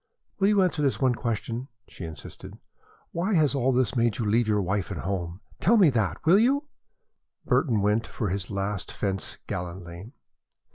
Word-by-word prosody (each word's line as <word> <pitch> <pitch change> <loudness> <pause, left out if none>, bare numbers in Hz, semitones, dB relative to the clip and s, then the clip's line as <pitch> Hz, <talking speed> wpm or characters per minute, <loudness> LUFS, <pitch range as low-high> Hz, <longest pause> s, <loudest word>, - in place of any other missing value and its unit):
"Will 195 - +4
you 205 -2 +4
answer 175 -4 0
this 140 -2 +1
one 130 -2 +3
question?" 115 +2 -3 0.2
she 90 - -8
insisted. 80 -4 -9 0.5
"Why 185 +5 0
has 155 -4 +3
all 135 -1 +2
this 130 -1 +1
made 115 -2 +2
you 115 - -2
leave 110 +2 +2
your 105 -1 +2
wife 95 +1 -1
and 95 -6 -4
home? 90 -1 -3 0.2
Tell 230 +6 +4
me 180 -8 +6
that, 105 - -1
will 180 +5 +6
you?" 270 +6 +3 0.8
Burton 115 - +2
went 105 +3 +1
for 105 - -3
his 95 0 -3
last 100 -1 -3
fence 95 -2 -3
gallantly. 90 +3 -6
115 Hz, 175 wpm, -26 LUFS, 95-140 Hz, 0.8 s, me